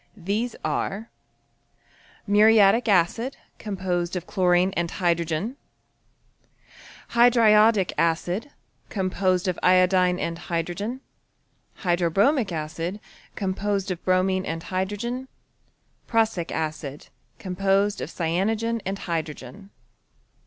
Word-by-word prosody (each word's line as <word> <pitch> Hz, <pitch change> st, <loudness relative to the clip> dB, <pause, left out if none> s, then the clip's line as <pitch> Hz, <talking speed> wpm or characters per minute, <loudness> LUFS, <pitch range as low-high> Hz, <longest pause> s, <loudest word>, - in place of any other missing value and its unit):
These 210 Hz, +6 st, -2 dB
are 215 Hz, +4 st, -3 dB, 1.1 s
Muriatic 215 Hz, +2 st, +5 dB
acid, 205 Hz, +8 st, +1 dB, 0.2 s
composedofchlorineand 180 Hz, -1 st, 0 dB
hydrogen. 170 Hz, -, -1 dB, 1.5 s
Hydriodic 225 Hz, -4 st, +5 dB
acid 175 Hz, -, 0 dB, 0.4 s
■.. 185 Hz, -2 st, 0 dB
iodine 185 Hz, 0 st, +4 dB
and 170 Hz, 0 st, -3 dB
hydrogen 180 Hz, +9 st, -3 dB, 0.8 s
Hydrobromic 190 Hz, -, +2 dB
acid.. 165 Hz, +4 st, -4 dB, 1.0 s
bromine 185 Hz, 0 st, +2 dB
and 165 Hz, -2 st, -4 dB
hydrogen 205 Hz, +8 st, -3 dB, 0.8 s
PruHsic 220 Hz, -7 st, +1 dB
acid.... 155 Hz, -3 st, -4 dB, 0.3 s
cyanogen 195 Hz, +3 st, 0 dB
and 195 Hz, +1 st, -3 dB
hydrogen. 165 Hz, +2 st, -5 dB
185 Hz, 65 wpm, -24 LUFS, 175-215 Hz, 1.5 s, Muriatic